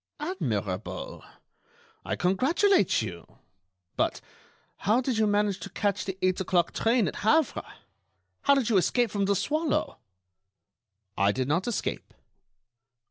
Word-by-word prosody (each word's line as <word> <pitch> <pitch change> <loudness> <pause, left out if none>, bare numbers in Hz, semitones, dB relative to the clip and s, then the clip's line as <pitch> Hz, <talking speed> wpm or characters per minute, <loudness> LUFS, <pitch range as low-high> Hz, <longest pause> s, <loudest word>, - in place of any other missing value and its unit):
"Admirable! 355 +6 -3 0.8
I - - -2
congratulate 255 - +2
you. 90 -5 -9 0.6
But - - 0 0.6
how 215 +5 +2
did 255 -3 -1
you 215 - +3
manage 205 -1 +1
to 200 - -7
catch 200 0 -1
the 190 -1 -4
eight 185 +1 +2
o'clock 175 -2 +1
train 230 -2 +2
at - - -4
Havre? 290 +7 +2 0.8
How 280 - +4
did 265 -5 +1
you 205 - +4
escape 235 +4 +2
from 200 -1 0
The 200 +1 +2
Swallow?" 305 - -1 1.2
"I 100 +1 +3
did 130 +4 -2
not 170 +8 0
escape." 235 - -3
205 Hz, 130 wpm, -27 LUFS, 185-260 Hz, 1.2 s, How